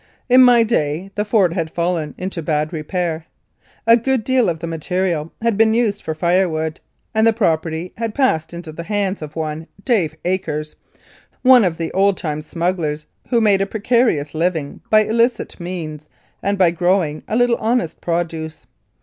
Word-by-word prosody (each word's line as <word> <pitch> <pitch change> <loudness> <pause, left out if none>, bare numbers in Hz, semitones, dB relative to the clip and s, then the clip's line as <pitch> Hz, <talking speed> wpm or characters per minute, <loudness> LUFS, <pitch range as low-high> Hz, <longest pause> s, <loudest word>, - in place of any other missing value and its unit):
In 255 0 +6
my 245 -2 +6
day 180 -4 -1
the 210 - -1
fort 205 -5 +2
had 165 -3 -2
fallen 170 -2 -2
into 185 -2 -4
bad 155 0 -1
repair. 165 0 -3 0.6
A 230 0 +7
good 245 0 0
deal 255 -4 +2
of 165 -2 -3
the 170 - -5
material 165 0 -2
had 230 -3 +1
been 225 0 +4
used 220 -4 +1
for 160 - -4
firewood, 165 -2 0 0.3
and 220 0 +3
the - - +6
property 165 -5 -1
had 225 -1 -3
passed 160 - +1
into 170 -2 -8
the 160 - -7
hands 200 -2 -1
of 155 0 -8
one 160 0 -4 0.2
Dave 190 - +1
Akers, 155 -5 -2 0.7
one 255 -2 +7
of 175 -4 0
the 165 -1 -3
old 195 +1 +2
time 155 -3 -3
smugglers, 165 -2 -2 0.2
who 240 - +3
made 205 -3 +4
a 195 - 0
precarious 220 - +1
living 160 -3 -2
by 215 0 +5
illicit 230 +1 0
means 160 -4 -6 0.3
and 200 +1 0
by 180 -3 +4
growing 175 -3 0
a - - -2
little 245 0 +3
honest 225 -6 -1
produce. 165 -2 -3
180 Hz, 170 wpm, -19 LUFS, 160-215 Hz, 0.7 s, A